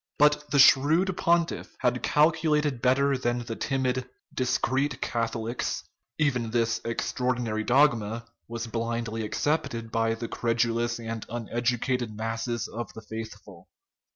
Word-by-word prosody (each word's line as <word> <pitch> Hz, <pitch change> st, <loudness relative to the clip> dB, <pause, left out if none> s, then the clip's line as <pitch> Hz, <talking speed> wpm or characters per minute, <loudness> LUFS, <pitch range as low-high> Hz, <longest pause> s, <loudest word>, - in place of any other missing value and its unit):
But 150 Hz, 0 st, +3 dB
the 145 Hz, -, +1 dB
shrewd 155 Hz, +7 st, +5 dB
pontiff 170 Hz, -1 st, 0 dB
had 125 Hz, -1 st, +1 dB
calculated 150 Hz, -4 st, +2 dB
better 135 Hz, +2 st, +3 dB
than 120 Hz, -1 st, -1 dB
the 115 Hz, -, -4 dB
timid 130 Hz, -1 st, -1 dB
" -, -, -34 dB
discreet 130 Hz, +1 st, 0 dB
Catholics 115 Hz, 0 st, -2 dB, 0.2 s
": -, -, -54 dB
even 125 Hz, -6 st, +1 dB
this 115 Hz, -1 st, 0 dB
extraordinary 115 Hz, -1 st, -1 dB
dogma 115 Hz, -4 st, +2 dB, 0.2 s
was 115 Hz, 0 st, -4 dB
blindly 115 Hz, -1 st, -3 dB
accepted 120 Hz, -2 st, -1 dB
by 115 Hz, 0 st, +1 dB
the 115 Hz, 0 st, -5 dB
credulous 120 Hz, 0 st, 0 dB
and 115 Hz, -1 st, -5 dB
uneducated 120 Hz, 0 st, -1 dB
masses 115 Hz, +1 st, -2 dB
of 120 Hz, -1 st, -6 dB
the 110 Hz, -, -9 dB
faithful. 105 Hz, -4 st, -9 dB
120 Hz, 125 wpm, -27 LUFS, 115-135 Hz, 0.2 s, shrewd